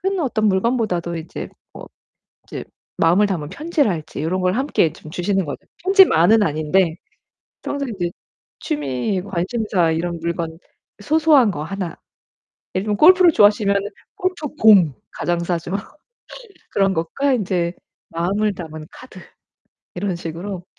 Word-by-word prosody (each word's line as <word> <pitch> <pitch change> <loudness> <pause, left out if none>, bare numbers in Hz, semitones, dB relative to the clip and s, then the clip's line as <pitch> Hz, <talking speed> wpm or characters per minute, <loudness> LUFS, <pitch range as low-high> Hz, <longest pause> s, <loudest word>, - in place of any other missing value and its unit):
큰 385 0 0
어떤 225 -7 0
물건보다도 190 -4 0
이제 160 0 -7 0.2
뭐 - - -10 0.6
이제 - - -7 0.3
마음을 180 +6 +4
담은 165 -7 -3
편지랄지 220 - -2
요런 180 +4 -1
걸 180 0 +1
함께 250 - +1
좀 155 - -13
주시는 190 +2 -1
거는 145 - -5 0.3
편지만은 225 - +5
아닌데 160 +1 +1 0.7
평소에 280 -2 -3
인제 175 -5 -3 0.5
취미 145 - -2
관심사 190 -1 0
이런 170 +1 -2
물건 165 -1 -3 0.4
소소한 305 -4 +4
거 150 -5 -4
하나, 185 0 -5 0.8
예를 185 - 0
들면 210 -1 -1
골프를 360 - +7
좋아하시면은 205 -3 +4 0.3
골프 365 -4 -2
공. 195 - +6 0.2
가장 175 -1 -2
싸죠. 170 0 -3 1.0
그런 195 -1 +2
것과 260 +13 0
인제 180 -6 -1 0.4
마음을 200 +5 0
담은 155 -4 -8
카드 255 -7 -13 0.8
이런 185 0 -2
식으로 175 +2 -6
190 Hz, 285 characters per minute, -20 LUFS, 170-220 Hz, 1.0 s, 골프를